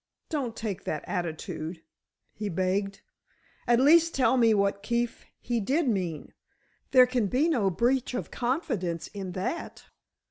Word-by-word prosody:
"Don't 265 Hz, -8 st, -2 dB
take 210 Hz, -4 st, -4 dB
that 155 Hz, -, -3 dB
attitude," 165 Hz, -2 st, -4 dB, 0.5 s
he 210 Hz, -1 st, -4 dB
begged. 195 Hz, +3 st, -1 dB, 0.7 s
"At 240 Hz, 0 st, +4 dB
least 330 Hz, +5 st, +5 dB
tell 260 Hz, 0 st, +3 dB
me 230 Hz, -3 st, +5 dB
what 200 Hz, -1 st, +1 dB
Keefe 235 Hz, +1 st, -2 dB
he 240 Hz, -1 st, -1 dB
did 275 Hz, +9 st, +1 dB
mean. 180 Hz, -8 st, -2 dB, 0.6 s
There 255 Hz, -1 st, +7 dB
can 250 Hz, -4 st, 0 dB
be 260 Hz, -, +2 dB
no 235 Hz, -12 st, +2 dB
breach 245 Hz, +7 st, 0 dB
of -, -, -4 dB
confidence 235 Hz, -, -2 dB
in 190 Hz, -3 st, -6 dB
that." 190 Hz, -, -4 dB
225 Hz, 140 wpm, -28 LUFS, 185-255 Hz, 0.7 s, There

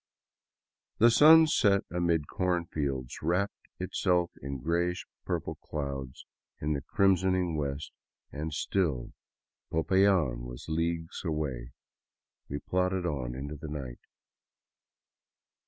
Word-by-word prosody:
The 115 Hz, +2 st, +6 dB
sun 160 Hz, +6 st, +8 dB
set 100 Hz, -10 st, +3 dB
amid 85 Hz, -4 st, +1 dB
corn 90 Hz, -2 st, 0 dB
fields, 70 Hz, -6 st, -3 dB
wrapping 90 Hz, +5 st, +1 dB, 0.2 s
itself 90 Hz, -1 st, +1 dB
in 70 Hz, 0 st, -4 dB
grayish 85 Hz, +6 st, -1 dB, 0.2 s
purple -, -, -3 dB
clouds 70 Hz, -3 st, -5 dB, 0.3 s
in 75 Hz, +1 st, 0 dB
the 70 Hz, -, -2 dB
crimsoning 95 Hz, 0 st, +2 dB
west, 70 Hz, -1 st, -3 dB, 0.4 s
and 75 Hz, +2 st, -4 dB
still 75 Hz, -4 st, -1 dB, 0.6 s
Popayan 85 Hz, -6 st, +3 dB
was -, -, -8 dB
leagues 80 Hz, 0 st, -2 dB
away. 70 Hz, -8 st, -3 dB, 0.8 s
We 70 Hz, -, -3 dB
plodded 90 Hz, +3 st, 0 dB
on 65 Hz, -7 st, -2 dB
into 70 Hz, +3 st, -5 dB
the 80 Hz, +2 st, -8 dB
night. 70 Hz, -5 st, -6 dB
80 Hz, 105 wpm, -30 LUFS, 70-90 Hz, 0.8 s, sun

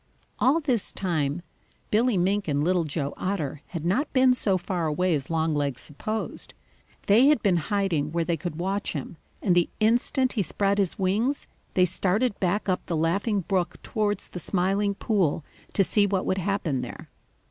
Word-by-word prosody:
All 275 Hz, +6 st, +4 dB
this 255 Hz, -, 0 dB
time 160 Hz, -3 st, -1 dB, 0.5 s
Billy 225 Hz, 0 st, +3 dB
Mink 195 Hz, +3 st, +1 dB
and 145 Hz, -1 st, +1 dB
Little 175 Hz, 0 st, +2 dB
Joe 145 Hz, -2 st, -3 dB
Otter 155 Hz, -7 st, -3 dB
had 170 Hz, -3 st, -6 dB
not 210 Hz, -, +1 dB
been 255 Hz, -1 st, +5 dB
so 200 Hz, -6 st, +2 dB
far 175 Hz, -2 st, -2 dB
away 175 Hz, +4 st, +1 dB
as 140 Hz, -3 st, -2 dB
Longlegs 150 Hz, -5 st, 0 dB
supposed. 215 Hz, +9 st, -5 dB, 0.5 s
They 225 Hz, +7 st, +6 dB
had 300 Hz, -6 st, +3 dB
been 185 Hz, -4 st, +3 dB
hiding 170 Hz, -5 st, 0 dB
where 170 Hz, 0 st, 0 dB
they 170 Hz, -, +1 dB
could 165 Hz, 0 st, -5 dB
watch 195 Hz, +4 st, -2 dB
him, 155 Hz, +2 st, -6 dB, 0.3 s
and 185 Hz, -, +3 dB
the 175 Hz, -1 st, +3 dB
instant 245 Hz, +4 st, +2 dB
he 220 Hz, -, 0 dB
spread 200 Hz, +2 st, 0 dB
his 195 Hz, -4 st, 0 dB
wings, 215 Hz, +9 st, 0 dB, 0.3 s
they 185 Hz, -, +5 dB
started 200 Hz, +6 st, 0 dB
back 195 Hz, +3 st, 0 dB
up 185 Hz, -1 st, 0 dB
the 165 Hz, -, -1 dB
Laughing 195 Hz, +6 st, +1 dB
Brook 175 Hz, -1 st, -1 dB
towards 210 Hz, -1 st, -1 dB
the 180 Hz, -, -6 dB
Smiling 195 Hz, +4 st, 0 dB
Pool 180 Hz, -9 st, 0 dB, 0.3 s
to 195 Hz, -, +4 dB
see 205 Hz, +2 st, +3 dB
what 195 Hz, -1 st, 0 dB
would 190 Hz, -, 0 dB
happen 180 Hz, -8 st, -1 dB
there. -, -, -8 dB
185 Hz, 175 wpm, -26 LUFS, 165-205 Hz, 0.5 s, They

